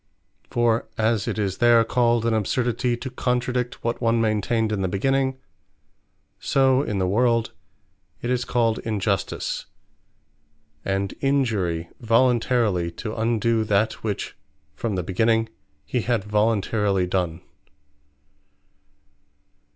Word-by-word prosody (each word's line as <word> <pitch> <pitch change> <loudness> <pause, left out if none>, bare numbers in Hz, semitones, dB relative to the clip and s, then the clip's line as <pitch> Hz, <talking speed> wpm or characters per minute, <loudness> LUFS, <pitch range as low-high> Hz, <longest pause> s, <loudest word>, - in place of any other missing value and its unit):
For 120 -1 +1
as 110 -1 +1
it - - -2
is 100 -3 -2
there 120 -1 +6
called 120 0 +2
an 115 - +2
Absurdity, 120 +3 0
to 130 +2 -6
contradict 125 0 -1
what 115 +1 -2
one 115 0 +2
maintained 110 0 +1
in 105 -2 -1
the 95 - +1
Beginning: 130 +7 0 1.0
so 135 -1 +3
in 105 -8 -2
the 95 -1 +1
world, 115 +3 +1 0.7
it 120 - -1
is 125 -1 +1
called 115 -3 +1
Injustice, 100 -3 -2 1.2
and 95 0 -1
Injury, 110 -12 0
voluntarily 115 -5 +2
to 110 +5 -5
undo 115 0 +1
that, 105 +2 0
which 105 -3 -3 0.4
from 110 -4 -3
the 90 - -1
beginning 110 +5 +1 0.4
he 125 - -1
had 115 -3 0
voluntarily 105 -2 +1
done. 90 -3 -2
115 Hz, 115 wpm, -24 LUFS, 100-120 Hz, 1.2 s, there